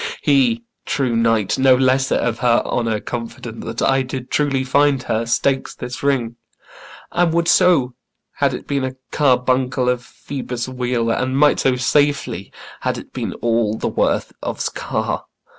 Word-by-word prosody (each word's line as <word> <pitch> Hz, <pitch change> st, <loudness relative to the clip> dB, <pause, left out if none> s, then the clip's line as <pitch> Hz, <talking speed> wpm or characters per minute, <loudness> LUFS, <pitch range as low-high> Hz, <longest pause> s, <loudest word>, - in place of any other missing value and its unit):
He, 125 Hz, -5 st, +3 dB, 0.2 s
true 135 Hz, -4 st, -1 dB
knight, 115 Hz, -2 st, +1 dB
No 130 Hz, -1 st, +6 dB
lesser 130 Hz, +1 st, +2 dB
of 115 Hz, -1 st, -1 dB
her 120 Hz, -2 st, +3 dB
honour 115 Hz, -3 st, -1 dB
confident 115 Hz, -1 st, -6 dB
Than 115 Hz, 0 st, -1 dB
I 135 Hz, 0 st, +3 dB
did 130 Hz, -1 st, -6 dB
truly 140 Hz, -3 st, +1 dB
find 140 Hz, 0 st, +2 dB
her, 115 Hz, +1 st, -1 dB
stakes 135 Hz, +3 st, 0 dB
this 125 Hz, -, -7 dB
ring; 125 Hz, -4 st, 0 dB, 0.7 s
And 175 Hz, -1 st, +2 dB
would 170 Hz, 0 st, +1 dB
so, 170 Hz, -11 st, +4 dB, 0.4 s
had -, -, +1 dB
it -, -, -8 dB
been 140 Hz, -1 st, -1 dB
a 130 Hz, 0 st, -3 dB, 0.2 s
carbuncle 130 Hz, -1 st, +2 dB
Of 125 Hz, -1 st, 0 dB
Phoebus' 125 Hz, -2 st, -6 dB
wheel; 125 Hz, -2 st, -1 dB
and 130 Hz, +3 st, 0 dB
might 145 Hz, 0 st, +4 dB
so 130 Hz, -1 st, +2 dB
safely, 140 Hz, -6 st, 0 dB, 0.3 s
had -, -, -1 dB
it -, -, -11 dB
Been -, -, -3 dB
all 115 Hz, -2 st, +1 dB
the -, -, -2 dB
worth -, -, 0 dB
of's -, -, -2 dB
car. -, -, -3 dB
130 Hz, 160 wpm, -20 LUFS, 120-135 Hz, 0.7 s, No